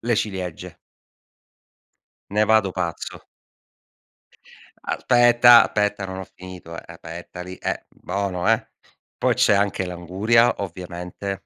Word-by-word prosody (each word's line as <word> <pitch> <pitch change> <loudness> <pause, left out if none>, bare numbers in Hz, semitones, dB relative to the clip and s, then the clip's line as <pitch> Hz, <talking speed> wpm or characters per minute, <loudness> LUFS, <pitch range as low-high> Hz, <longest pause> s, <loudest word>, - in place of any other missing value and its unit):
le 120 0 0
ciliegie 95 -5 -4 1.5
ne 105 +1 +2
vado 110 -3 +3
pazzo. 85 -2 -4 1.6
Aspetta, 120 -1 +6
aspetta 105 -1 -1
non 95 0 -6
ho 95 - -6
finito, 90 -2 -10
eh, - - -9
aspetta 85 +2 -9
lì, 90 +1 -8
eh, - - -4
bono, 100 0 -2
eh. 115 0 0 0.5
Poi - - +2
c'è - - +4
anche 100 -1 +1
l'anguria, 95 +7 +2
ovviamente, 90 +1 -6
95 Hz, 110 wpm, -22 LUFS, 90-110 Hz, 1.6 s, Aspetta